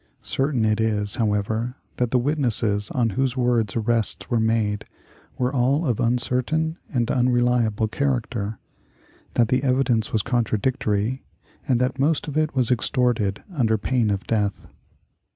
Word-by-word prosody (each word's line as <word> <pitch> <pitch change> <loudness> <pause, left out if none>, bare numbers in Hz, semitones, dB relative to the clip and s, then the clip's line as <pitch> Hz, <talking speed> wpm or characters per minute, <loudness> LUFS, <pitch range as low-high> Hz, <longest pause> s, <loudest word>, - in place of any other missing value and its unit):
Certain 135 -5 0
it 110 0 +1
is, 105 -1 -1
however, 110 +2 -1 0.2
that 125 -1 +1
the 125 - +2
witnesses 120 -7 0
on 115 -3 0
whose 130 +3 -1
words 120 -4 +1
arrests 115 +1 0
were 120 - +3
made 110 -2 0 0.5
were 125 0 0
all 135 +5 +2
of 120 -6 0
uncertain 125 +7 0
and 120 -4 0
unreliable 120 -3 +2
character; 115 -4 -2 0.8
that 115 -2 +3
the 130 0 +2
evidence 130 -4 +1
was 110 -2 +1
contradictory, 115 0 0 0.5
and 125 -3 +2
that 125 +1 -1
most 150 +3 +1
of 145 - -5
it 155 -1 0
was 130 -1 +1
extorted 120 -5 +1
under 115 -8 +2
pain 115 +1 0
of 100 -1 -2
death. 105 -3 -1
120 Hz, 140 wpm, -23 LUFS, 110-130 Hz, 0.8 s, were